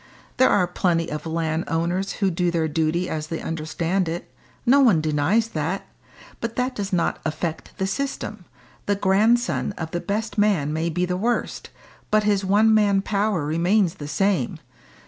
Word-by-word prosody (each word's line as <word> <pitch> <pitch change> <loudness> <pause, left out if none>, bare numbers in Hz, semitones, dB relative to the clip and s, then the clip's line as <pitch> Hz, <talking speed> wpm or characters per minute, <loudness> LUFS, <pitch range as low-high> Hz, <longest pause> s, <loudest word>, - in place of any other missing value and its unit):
"There 260 - +5
are 200 -3 +3
plenty 175 -2 0
of 150 +2 -4
landowners 165 +3 -1
who 195 -3 0
do 175 +1 0
their 165 -2 0
duty 160 +3 0
as 155 -1 -3
they 165 0 -4
understand 165 +3 -2
it 170 +1 -6 0.3
no 265 +3 +5
one 230 - +5
denies 155 +9 +1
that. - - -3 0.5
But 230 0 -4
that 255 +1 0
does 200 -1 -3
not 175 -3 0
affect 160 +1 -4
the 190 - 0
system; 215 -3 -4 0.4
the 205 - +2
grandson 210 +4 +2
of 160 -1 -5
the 175 - -2
best 215 +2 -2
man 185 -9 +2
may 160 +2 -1
be 180 +2 0
the 180 0 -2
worst, 235 +5 -2 0.4
but 215 0 +3
his 205 -1 +2
one 210 +3 +4
man 200 -2 +3
power 200 -6 0
remains 175 +4 +2
the 145 - -5
same. 195 +4 0
185 Hz, 165 wpm, -23 LUFS, 165-210 Hz, 0.5 s, There